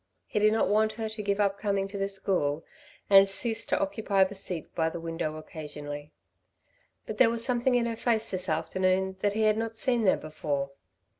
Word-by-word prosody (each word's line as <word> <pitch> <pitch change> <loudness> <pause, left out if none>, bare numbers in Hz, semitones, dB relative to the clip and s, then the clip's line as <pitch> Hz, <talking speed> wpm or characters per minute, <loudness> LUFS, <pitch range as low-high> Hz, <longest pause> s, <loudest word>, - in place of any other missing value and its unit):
He - - -2
did 215 +1 +4
not 220 - +2
want 215 +1 +2
her 220 0 -4
to 220 0 -6
give 200 0 -1
up 200 -1 +1
coming 200 -2 0
to 205 - -9
the 195 - 0
school 180 -6 -1 0.4
and 195 0 +7
cease 225 +3 +2
to 290 0 0
occupy 220 -10 +1
the 190 +1 -3
seat 185 -4 -4
by 160 -1 +1
the 170 - -6
window 165 -1 -4
occasionally. 150 -1 -8 0.9
But - - -7
there 255 - +6
was 230 0 +1
something 250 0 +1
in 240 -1 +2
her 230 -1 -2
face 225 -1 +1
this 185 0 -2
afternoon 185 +4 0
that 205 +1 0
he 220 +1 0
had 215 0 +3
not 225 0 -4
seen 245 -2 +2
there 190 - +4
before. 145 -3 -4
200 Hz, 205 wpm, -28 LUFS, 170-225 Hz, 0.9 s, and